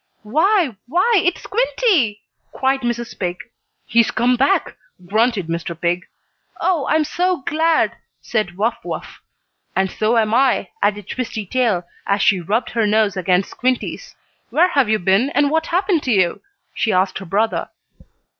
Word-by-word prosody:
"Why 315 Hz, -, +2 dB
why, 370 Hz, -, +3 dB
it's 355 Hz, 0 st, 0 dB
Squinty!" 395 Hz, -, +1 dB, 0.3 s
cried 265 Hz, +1 st, +1 dB
Mrs. 240 Hz, -1 st, -4 dB
Pig. 180 Hz, -1 st, -2 dB, 0.5 s
"He's 235 Hz, -1 st, +3 dB
come 245 Hz, +2 st, +2 dB
back!" 280 Hz, +7 st, +1 dB, 0.3 s
grunted 215 Hz, 0 st, +1 dB
Mr. 170 Hz, 0 st, -4 dB
Pig. 175 Hz, +3 st, -1 dB, 0.5 s
"Oh, 340 Hz, -7 st, 0 dB
I'm 315 Hz, 0 st, +3 dB
so 360 Hz, +2 st, -1 dB
glad!" 320 Hz, +1 st, +1 dB, 0.2 s
said 210 Hz, -6 st, -2 dB
Wuff 225 Hz, +4 st, 0 dB
Wuff. -, -, -7 dB, 0.5 s
"And 190 Hz, -1 st, +1 dB
so 220 Hz, +2 st, +1 dB
am 220 Hz, -1 st, +2 dB
I," 250 Hz, -6 st, +2 dB
added 205 Hz, -1 st, 0 dB
Twisty 230 Hz, -4 st, -4 dB
Tail, 215 Hz, -5 st, 0 dB, 0.2 s
as 200 Hz, 0 st, +1 dB
she 195 Hz, -, +4 dB
rubbed 210 Hz, +8 st, -1 dB
her 230 Hz, -2 st, +1 dB
nose 210 Hz, -1 st, +2 dB
against 185 Hz, 0 st, +1 dB
Squinty's. 255 Hz, -, -2 dB, 0.3 s
"Where 355 Hz, +4 st, +3 dB
have 275 Hz, -9 st, +2 dB
you 215 Hz, -, +3 dB
been, 195 Hz, +7 st, +2 dB
and 290 Hz, 0 st, +3 dB
what 320 Hz, +1 st, 0 dB
happened 355 Hz, -1 st, +1 dB
to 255 Hz, -, -2 dB
you?" 185 Hz, -5 st, +2 dB, 0.3 s
she 220 Hz, -, 0 dB
asked 185 Hz, 0 st, +1 dB
her 195 Hz, -, -9 dB
brother. 210 Hz, +5 st, 0 dB
230 Hz, 155 wpm, -19 LUFS, 200-300 Hz, 0.5 s, she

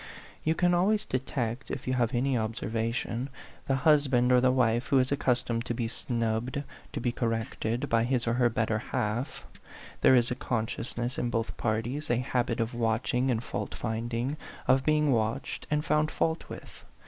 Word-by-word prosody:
You 160 Hz, +1 st, +2 dB
can 175 Hz, +1 st, +3 dB
always 200 Hz, +5 st, +2 dB
detect, 125 Hz, -1 st, -2 dB
if 135 Hz, -, -4 dB
you 130 Hz, -, +1 dB
have 120 Hz, 0 st, +1 dB
any 130 Hz, +2 st, +1 dB
observation, 115 Hz, +2 st, -2 dB, 0.4 s
the 135 Hz, -, +2 dB
husband 135 Hz, -4 st, +4 dB
or 125 Hz, 0 st, +6 dB
the 130 Hz, -, +4 dB
wife 120 Hz, -1 st, +2 dB
who 140 Hz, -, +3 dB
is 130 Hz, 0 st, +2 dB
accustomed 125 Hz, -4 st, +1 dB
to 120 Hz, -, -2 dB
be 115 Hz, -1 st, -1 dB
snubbed, 115 Hz, +3 st, -2 dB, 0.3 s
to -, -, -2 dB
be 120 Hz, -, 0 dB
corrected, 115 Hz, 0 st, -2 dB
by 115 Hz, 0 st, +2 dB
his 125 Hz, -1 st, 0 dB
or 115 Hz, -, +1 dB
her 120 Hz, 0 st, +3 dB
better 110 Hz, -1 st, 0 dB
half; 120 Hz, +1 st, -3 dB, 0.6 s
there 130 Hz, -, +7 dB
is 120 Hz, -1 st, +3 dB
a -, -, 0 dB
consciousness 120 Hz, 0 st, -2 dB
in 120 Hz, -, 0 dB
both 115 Hz, -1 st, -2 dB
parties, 120 Hz, +7 st, -2 dB
a 120 Hz, -, +3 dB
habit 125 Hz, -2 st, 0 dB
of 115 Hz, +2 st, -1 dB
watching 120 Hz, +3 st, +1 dB
and 120 Hz, -2 st, 0 dB
fault 105 Hz, -2 st, -4 dB
finding, 120 Hz, +5 st, -2 dB, 0.3 s
of 130 Hz, 0 st, +4 dB
being 150 Hz, -1 st, +3 dB
watched 110 Hz, -2 st, -1 dB
and 150 Hz, 0 st, 0 dB
found 150 Hz, 0 st, +2 dB
fault 160 Hz, +1 st, -1 dB
with. -, -, -10 dB
120 Hz, 175 wpm, -29 LUFS, 115-135 Hz, 0.6 s, there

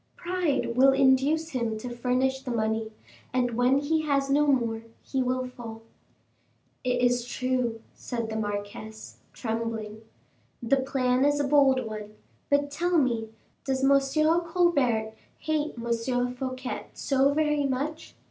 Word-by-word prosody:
Pride 345 Hz, -9 st, -1 dB
will 270 Hz, +2 st, +6 dB
induce 275 Hz, +4 st, +3 dB
him 235 Hz, -6 st, -2 dB
to 215 Hz, -, -7 dB
furnish 255 Hz, +2 st, 0 dB
the 265 Hz, -, -7 dB
money, 220 Hz, -1 st, -1 dB, 0.4 s
and 245 Hz, -1 st, +1 dB
when 250 Hz, +3 st, +3 dB
he 310 Hz, +3 st, +1 dB
has 275 Hz, -2 st, 0 dB
no 295 Hz, +1 st, +3 dB
more, 235 Hz, -5 st, +1 dB, 0.2 s
he 265 Hz, -, -1 dB
will 255 Hz, 0 st, 0 dB
fall." 230 Hz, -3 st, -9 dB, 1.0 s
"It 250 Hz, -1 st, 0 dB
is 245 Hz, 0 st, +3 dB
true," 250 Hz, -3 st, -1 dB
said 235 Hz, -2 st, -4 dB
the -, -, -3 dB
marquise, 210 Hz, +1 st, -5 dB
trembling; 225 Hz, -2 st, -4 dB, 0.6 s
"the 245 Hz, +4 st, +2 dB
plan 260 Hz, -1 st, +1 dB
is 290 Hz, 0 st, +3 dB
a -, -, +2 dB
bold 270 Hz, -3 st, +4 dB
one; 215 Hz, -1 st, -7 dB, 0.3 s
but 285 Hz, 0 st, +2 dB
tell 350 Hz, +4 st, +1 dB
me, 235 Hz, -6 st, +1 dB, 0.3 s
does 265 Hz, -1 st, -1 dB
M. 275 Hz, 0 st, +6 dB, 0.4 s
Colbert 280 Hz, -11 st, +1 dB, 0.2 s
hate 310 Hz, -1 st, -2 dB
M. 235 Hz, +2 st, -1 dB
Fouquet 255 Hz, 0 st, -5 dB
so 275 Hz, 0 st, +2 dB
very 300 Hz, -1 st, +1 dB
much?" 285 Hz, +4 st, -4 dB
255 Hz, 140 wpm, -27 LUFS, 230-280 Hz, 1.0 s, will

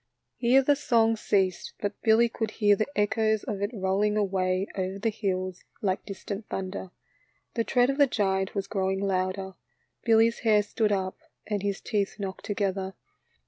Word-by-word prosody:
Here 260 Hz, +3 st, +4 dB
the 290 Hz, +2 st, +4 dB
song 225 Hz, -5 st, +3 dB
ceased, 190 Hz, -4 st, 0 dB
but 205 Hz, 0 st, -4 dB
Billy 225 Hz, +1 st, +5 dB
could 225 Hz, -1 st, -3 dB
hear 205 Hz, -2 st, +5 dB
the 215 Hz, -, -1 dB
echoes 215 Hz, +1 st, +1 dB
of 200 Hz, -2 st, -4 dB
it 205 Hz, -, 0 dB
rolling 205 Hz, 0 st, +1 dB
away 190 Hz, -2 st, +1 dB
over 190 Hz, 0 st, -2 dB
the 220 Hz, +3 st, 0 dB
hills 185 Hz, -3 st, -3 dB, 0.2 s
like 190 Hz, -2 st, -1 dB
distant 200 Hz, +1 st, -6 dB
thunder. 190 Hz, 0 st, -4 dB, 0.6 s
The 230 Hz, -, 0 dB
tread 245 Hz, +2 st, +3 dB
of 275 Hz, -, -5 dB
the 285 Hz, -, +7 dB
giant 190 Hz, -5 st, 0 dB
was 195 Hz, -1 st, -1 dB
growing 190 Hz, -1 st, -1 dB
louder, 190 Hz, 0 st, -1 dB, 0.5 s
Billy's 230 Hz, 0 st, +4 dB
hair 215 Hz, -3 st, +4 dB
stood 210 Hz, +1 st, 0 dB
up 190 Hz, -2 st, -1 dB, 0.3 s
and 210 Hz, -2 st, -2 dB
his 200 Hz, -1 st, -1 dB
teeth 205 Hz, -3 st, -1 dB
knocked 195 Hz, -3 st, -5 dB
together. 195 Hz, -2 st, -2 dB
205 Hz, 165 wpm, -27 LUFS, 190-220 Hz, 0.6 s, the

